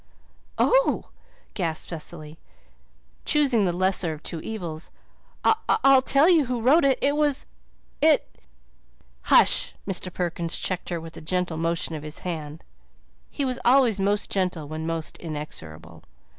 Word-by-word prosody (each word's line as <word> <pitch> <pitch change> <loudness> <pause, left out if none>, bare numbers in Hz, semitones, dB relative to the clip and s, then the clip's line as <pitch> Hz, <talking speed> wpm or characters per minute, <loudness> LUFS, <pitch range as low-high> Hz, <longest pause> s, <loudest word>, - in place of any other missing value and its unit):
"Oh," - - +2 0.4
gasped 165 -5 -3
Cecily, 155 -1 -7 0.8
choosing 270 -8 +3
the 180 - +1
lesser 185 -2 +1
of 155 - -11
two 165 - -2
evils, 175 -7 -6 0.6
"I'll 275 -11 +4
tell 275 +4 +4
you 335 -6 +5
who 250 -1 -2
wrote 295 +8 +5
it 275 -1 +3
it 285 +1 +2
was 295 -2 +1 1.8
"Hush!" - - +4
Mr. 185 -1 -1
Perkins 170 -1 -2
checked 185 -1 -3
her 170 -2 -2
with 165 0 -10
a - - -8
gentle 175 0 -2
motion 165 0 -1
of 155 - -5
his 150 +1 -6
hand. 155 -3 -5 0.7
He 280 - -2
was 255 -1 -2
always 245 -5 +4
most 205 +1 0
gentle 180 -6 -1
when 155 +1 -5
most 165 -1 -4
inexorable. 85 - -8
180 Hz, 135 wpm, -25 LUFS, 160-255 Hz, 1.8 s, you